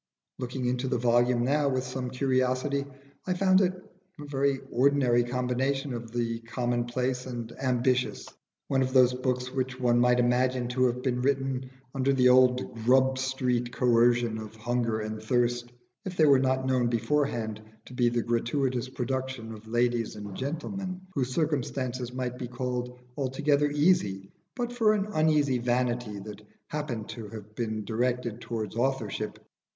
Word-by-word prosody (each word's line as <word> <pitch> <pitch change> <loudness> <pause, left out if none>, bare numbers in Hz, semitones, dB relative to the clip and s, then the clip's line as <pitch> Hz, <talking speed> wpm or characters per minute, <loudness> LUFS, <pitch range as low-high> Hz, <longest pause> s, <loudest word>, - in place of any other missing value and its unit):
Looking 125 0 -3
into 125 +1 0
the 125 -1 0
volume 120 0 +3
now 140 +2 +2
with 130 -1 0
some 125 0 -4
curiosity, 130 +2 0 0.4
I 180 - +1
found 185 +1 +4
it 185 -1 +1 0.4
a 145 - -7
very 140 -1 0
ordinary 125 -2 +3
combination 125 +2 -1
of 115 -1 -6
the 115 -1 -1
commonplace 120 +2 -2
and 120 -2 -5
ambitious, 125 -1 +1 0.4
one 135 -1 +1
of 130 0 0
those 125 -1 +6
books 125 0 -2
which 130 0 -3
one 120 -1 +3
might 125 0 +4
imagine 125 0 +2
to 130 +1 +2
have 125 +1 -3
been 125 -2 0
written 135 -1 0 0.2
under 135 0 +1
the 125 -1 +5
old 125 0 +4
Grub 130 +2 +4
Street 125 -2 0
coercion 120 -2 +3
of 110 0 -8
hunger 115 -1 -1
and 110 0 -5
thirst, 120 +1 0 0.3
if 185 -1 -6
they 155 - +6
were 140 -3 +6
not 130 0 +1
known 130 -2 +2
beforehand 115 -2 0 0.2
to - - -12
be 120 -1 +3
the 120 -1 0
gratuitous 120 +2 0
productions 130 -2 -3
of 110 0 -12
ladies 120 -1 0
and 105 -2 -7
gentlemen 185 +7 -4
whose 130 -5 -1
circumstances 130 -4 -1
might 125 -1 -4
be 125 - -4
called 125 0 -4 0.2
altogether 145 +2 +1
easy, 145 - +1 0.2
but 245 -1 -3
for 220 -3 +3
an 200 -2 0
uneasy 150 -5 +3
vanity 120 -3 0
that 105 +1 -8 0.3
happened 145 -8 -4
to 115 -3 -7
have 105 -1 -10
been 110 -2 -3
directed 120 +1 -1
towards 110 -3 -4
authorship. 120 -4 -1
125 Hz, 155 wpm, -28 LUFS, 120-135 Hz, 0.4 s, those